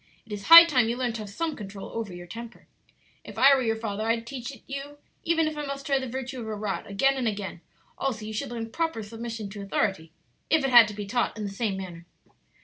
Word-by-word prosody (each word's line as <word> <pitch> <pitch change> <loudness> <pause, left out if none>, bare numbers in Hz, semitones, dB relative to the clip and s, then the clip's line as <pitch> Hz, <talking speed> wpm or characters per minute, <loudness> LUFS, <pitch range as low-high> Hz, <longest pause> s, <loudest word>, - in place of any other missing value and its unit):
"It 225 - -17
is 205 -1 -5
high 335 +1 +12
time 255 -8 +2
you 235 - -2
learned 250 -2 -1
to - - -6
have 210 - -7
some 315 +9 -3
control 195 -2 -8
over 225 -4 -4
your 175 0 -9
temper. 230 +6 -10 0.6
If - - -11
I 275 +1 +7
were 270 - +3
your 225 -2 0
father 215 -2 -4
I'd 230 0 0
teach 250 -1 -6
it 260 - -14
you, 280 +1 -7 0.3
even 330 -3 +2
if 310 - -3
I 295 - -4
must 275 -1 -5
try 275 -1 +2
the 260 - -5
virtue 260 +1 -5
of 220 - -6
a 215 - -3
rod 205 -1 -4
again 270 +8 +2
and 250 -3 -1
again; 200 -5 -4 0.4
also 230 -6 -2
you 220 - -6
should 250 +5 -3
learn 230 -1 -5
proper 325 -8 -2
submission 225 0 -6
to 205 0 -7
authority, 195 -4 -1 0.4
if 320 -3 +3
it 270 - 0
had 240 -2 +9
to 210 - -7
be 205 0 -5
taught 235 +2 -1
in 215 - -4
the 200 - -4
same 200 -1 -2
manner." 175 -3 -8
230 Hz, 250 wpm, -26 LUFS, 210-270 Hz, 0.6 s, high